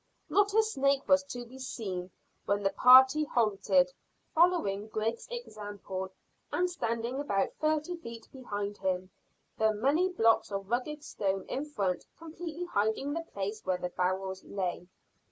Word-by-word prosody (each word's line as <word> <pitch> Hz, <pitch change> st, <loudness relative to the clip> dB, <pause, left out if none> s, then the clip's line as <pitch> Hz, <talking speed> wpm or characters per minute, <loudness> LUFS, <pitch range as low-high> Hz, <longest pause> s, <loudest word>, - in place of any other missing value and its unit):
Not 410 Hz, 0 st, +3 dB
a 445 Hz, -, +6 dB
snake 275 Hz, -9 st, +1 dB
was 280 Hz, 0 st, +6 dB
to 245 Hz, -3 st, -6 dB
be 255 Hz, +3 st, -13 dB
seen 190 Hz, -8 st, -4 dB, 0.4 s
when 205 Hz, 0 st, 0 dB
the 195 Hz, -, +2 dB
party 260 Hz, +4 st, +8 dB
halted, 195 Hz, -8 st, +2 dB, 0.4 s
following 315 Hz, -, +3 dB
Griggs's 220 Hz, +1 st, -2 dB
example, 205 Hz, -, -6 dB, 0.4 s
and 360 Hz, -, +2 dB
standing 235 Hz, -6 st, -2 dB
about 200 Hz, -9 st, 0 dB
thirty 310 Hz, +2 st, 0 dB
feet 230 Hz, -7 st, -9 dB
behind 205 Hz, -6 st, -4 dB
him, 185 Hz, -1 st, -1 dB, 0.5 s
the 220 Hz, 0 st, +4 dB
many 290 Hz, -, +2 dB
blocks 225 Hz, -, +3 dB
of 195 Hz, +1 st, -4 dB
rugged 295 Hz, +5 st, -2 dB
stone 195 Hz, -9 st, -2 dB
in 275 Hz, -, -3 dB
front 195 Hz, -12 st, -2 dB
completely 330 Hz, +1 st, -6 dB
hiding 220 Hz, 0 st, 0 dB
the 335 Hz, -, -2 dB
place 205 Hz, +2 st, -4 dB
where 185 Hz, -1 st, 0 dB
the 180 Hz, 0 st, -3 dB
barrels 190 Hz, +1 st, -2 dB
lay. 180 Hz, -2 st, -3 dB
225 Hz, 145 wpm, -30 LUFS, 195-295 Hz, 0.5 s, party